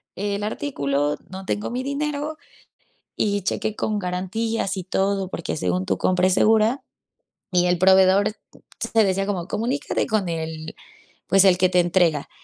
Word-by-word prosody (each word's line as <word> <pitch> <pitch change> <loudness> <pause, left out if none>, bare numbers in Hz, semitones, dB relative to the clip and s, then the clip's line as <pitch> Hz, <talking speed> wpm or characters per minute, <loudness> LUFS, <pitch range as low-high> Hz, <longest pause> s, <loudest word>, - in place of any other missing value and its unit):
el 200 +1 -2
artículo, 145 - -1
no 190 0 -8
tengo 205 +4 -2
mi 250 +1 -3
dinero", 295 +2 -3 0.8
y 205 -1 0
chequé 215 +3 -2
con 215 -1 -1
garantías 195 +3 -2
y 185 - -4
todo, 195 +1 -1
porque 170 - -4
según 90 -4 -1
tu 95 - 0
compra 185 - +2
es 185 - +2
segura, 220 +4 +3 0.7
y 180 0 +3
el 180 0 +2
proveedor 190 +2 +5 0.6
te 225 - +5
decía 195 0 0
como: 185 -4 -2
"Comunícate 240 +7 -1
con 210 -4 0
el, 160 -1 -5 0.5
pues, 195 +2 +5
el 185 -2 +5
que 185 0 +3
te 180 - +3
entrega". 175 -4 +2
190 Hz, 155 wpm, -23 LUFS, 180-215 Hz, 0.8 s, proveedor